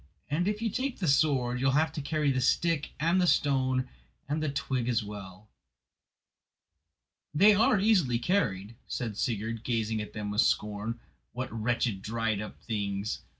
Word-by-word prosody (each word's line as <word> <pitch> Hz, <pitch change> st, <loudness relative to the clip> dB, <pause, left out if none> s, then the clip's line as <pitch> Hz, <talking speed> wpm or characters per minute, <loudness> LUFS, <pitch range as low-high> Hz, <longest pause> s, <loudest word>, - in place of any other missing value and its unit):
And 175 Hz, +5 st, +1 dB
if 210 Hz, +2 st, -1 dB
you 225 Hz, -, 0 dB
take 260 Hz, +3 st, -2 dB
the 180 Hz, -, -2 dB
sword 135 Hz, -4 st, +2 dB
you 135 Hz, -, +1 dB
will 135 Hz, -, +3 dB
have 155 Hz, +1 st, +2 dB
to 155 Hz, -, -5 dB
carry 150 Hz, 0 st, 0 dB
the 130 Hz, -1 st, 0 dB
stick 165 Hz, +3 st, +1 dB
and 170 Hz, +4 st, +3 dB
the 180 Hz, -, +3 dB
stone 130 Hz, -4 st, +2 dB, 0.4 s
and 150 Hz, +2 st, -1 dB
the 155 Hz, -, 0 dB
twig 130 Hz, -3 st, -2 dB
as 115 Hz, -2 st, +1 dB
well." 100 Hz, -1 st, -9 dB, 1.9 s
"They 200 Hz, +7 st, +7 dB
are 210 Hz, 0 st, +4 dB
easily 185 Hz, -, +3 dB
carried," 115 Hz, -, 0 dB
said 115 Hz, -5 st, -3 dB
Sigurd, 115 Hz, 0 st, -2 dB
gazing 110 Hz, -2 st, -1 dB
at 105 Hz, -, -8 dB
them 105 Hz, -1 st, -4 dB
with 105 Hz, -, +3 dB
scorn; 105 Hz, +2 st, 0 dB, 0.3 s
"what 125 Hz, -1 st, -5 dB
wretched 115 Hz, -2 st, -1 dB
dried 110 Hz, -1 st, -1 dB
up 105 Hz, -, -8 dB
things! 100 Hz, -2 st, -2 dB
125 Hz, 165 wpm, -29 LUFS, 110-155 Hz, 1.9 s, They